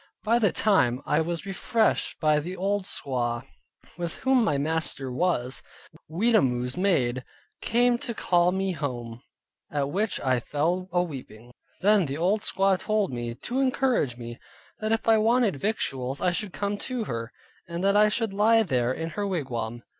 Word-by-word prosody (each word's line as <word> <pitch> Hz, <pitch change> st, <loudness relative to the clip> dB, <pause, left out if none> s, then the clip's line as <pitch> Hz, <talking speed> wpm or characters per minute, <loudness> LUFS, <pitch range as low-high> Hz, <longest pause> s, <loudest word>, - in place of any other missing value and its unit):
By 230 Hz, +2 st, +3 dB
the 210 Hz, -5 st, +3 dB
time 130 Hz, -, +2 dB
I 150 Hz, +2 st, +2 dB
was 170 Hz, +2 st, -3 dB
refreshed 215 Hz, +3 st, 0 dB
by 155 Hz, -1 st, +3 dB
the 180 Hz, +5 st, -6 dB
old 200 Hz, +1 st, -1 dB
squaw, 120 Hz, -6 st, -2 dB, 0.6 s
with 170 Hz, -1 st, -3 dB
whom 260 Hz, -2 st, +2 dB
my 150 Hz, -10 st, +1 dB
master 145 Hz, -3 st, 0 dB
was, 130 Hz, -3 st, 0 dB, 0.5 s
Weetamoo's 155 Hz, -, +1 dB
maid 130 Hz, -10 st, +1 dB, 0.4 s
came 240 Hz, +1 st, +2 dB
to 235 Hz, -, -4 dB
call 175 Hz, -2 st, +2 dB
me 190 Hz, +1 st, -1 dB
home, 120 Hz, -7 st, -5 dB, 0.5 s
at 145 Hz, -1 st, -1 dB
which 205 Hz, +4 st, 0 dB
I 130 Hz, -2 st, +2 dB
fell 170 Hz, +9 st, -1 dB
aweeping. 135 Hz, -10 st, -4 dB, 0.3 s
Then 200 Hz, -3 st, +4 dB
the 135 Hz, +2 st, -4 dB
old 190 Hz, +6 st, +1 dB
squaw 195 Hz, -2 st, +2 dB
told 215 Hz, -, 0 dB
me, 120 Hz, -1 st, -4 dB
to 245 Hz, -, -3 dB
encourage 260 Hz, -, +1 dB
me, 120 Hz, -1 st, -8 dB, 0.4 s
that 215 Hz, 0 st, -2 dB
if 225 Hz, -, 0 dB
I 225 Hz, -1 st, +5 dB
wanted 225 Hz, -, +2 dB
victuals, 135 Hz, -, -2 dB
I 180 Hz, -, +2 dB
should 190 Hz, +2 st, -3 dB
come 200 Hz, +1 st, -3 dB
to 255 Hz, -3 st, -3 dB
her, 115 Hz, -, -5 dB, 0.4 s
and 170 Hz, +1 st, -4 dB
that 200 Hz, +1 st, +3 dB
I 210 Hz, +1 st, +6 dB
should 220 Hz, -1 st, 0 dB
lie 225 Hz, +3 st, +4 dB
there 125 Hz, -, 0 dB
in 165 Hz, +5 st, -4 dB
her 205 Hz, +4 st, -2 dB
wigwam. 120 Hz, -, -3 dB
175 Hz, 165 wpm, -26 LUFS, 130-210 Hz, 0.6 s, I